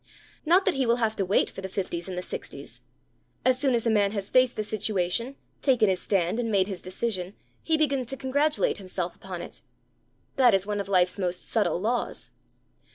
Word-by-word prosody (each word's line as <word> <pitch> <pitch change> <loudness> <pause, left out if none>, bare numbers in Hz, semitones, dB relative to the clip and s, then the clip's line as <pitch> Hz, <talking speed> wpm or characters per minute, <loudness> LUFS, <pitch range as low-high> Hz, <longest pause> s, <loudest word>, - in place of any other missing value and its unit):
Not 365 +4 +5
that 385 - +3
he 270 -3 0
will 235 - +4
have 225 -2 0
to 195 - 0
wait 195 - +3
for - - -8
the 190 - -5
fifties 180 -2 -3
and 180 - -5
the 180 - -3
sixties. - - -7 0.6
As 255 0 +4
soon 265 -3 +2
as 230 - -1
a - - +3
man 205 -1 +2
has 200 -2 -4
faced 255 -1 +4
the 215 - -1
situation, 215 +3 -1 0.3
taken 245 -7 +4
his 185 -1 0
stand, 190 +2 0
and 235 -2 -1
made 195 -2 +3
his 190 -3 -5
decision, 185 0 -3 0.3
he 320 -1 +2
begins 275 -5 +1
to 270 - -4
congratulate 285 0 +1
himself 185 -2 -4
upon 180 -2 -7
it. - - -9 0.8
That 245 -6 +6
is 195 0 0
one 205 0 -2
of 200 -1 -4
life's 185 0 +2
most 180 -1 -2
subtle 210 -5 +1
laws. 235 +5 -2
210 Hz, 205 wpm, -27 LUFS, 185-250 Hz, 0.8 s, That